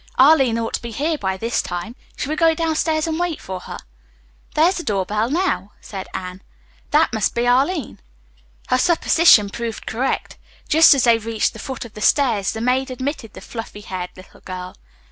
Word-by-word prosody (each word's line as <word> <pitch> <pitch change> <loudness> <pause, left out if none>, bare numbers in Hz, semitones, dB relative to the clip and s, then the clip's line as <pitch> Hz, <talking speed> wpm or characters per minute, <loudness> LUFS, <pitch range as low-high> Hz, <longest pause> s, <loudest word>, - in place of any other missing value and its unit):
Arline 265 -4 +5
ought 225 -1 -3
to - - -2
be 235 - -6
here 295 +8 -1
by 190 -8 -2
this 230 +4 -1
time. 180 +7 -6 0.2
Shall 280 - -3
we - - 0
go 325 0 +3
downstairs 315 -1 0
and 325 0 -2
wait 350 -3 -1
for 185 -1 -6
her?" - - -8 0.8
"There's 335 +5 +3
the 345 - -4
door 200 - -1
bell 215 +4 -1
now," 320 - -1
said 195 -3 -8
Anne. 185 0 -6 0.5
"That 300 -3 +3
must 220 -3 0
be 235 +1 +1
Arline." 270 - +1 0.7
Her 255 - +3
supposition 325 - +5
proved 230 0 -5
correct. 250 +4 -2 0.3
Just 320 -1 +7
as 270 - +1
they 235 -2 +4
reached 225 -1 -1
the - - -11
foot 260 -3 -6
of 225 - -12
the 210 - -9
stairs 225 -7 +2
the 220 - -5
maid 255 +3 +1
admitted 255 -3 -5
the - - -10
fluffy 225 -3 -8
haired 185 -3 -5
little 185 +1 -16
girl. 185 -1 -7
240 Hz, 190 wpm, -20 LUFS, 210-305 Hz, 0.8 s, Just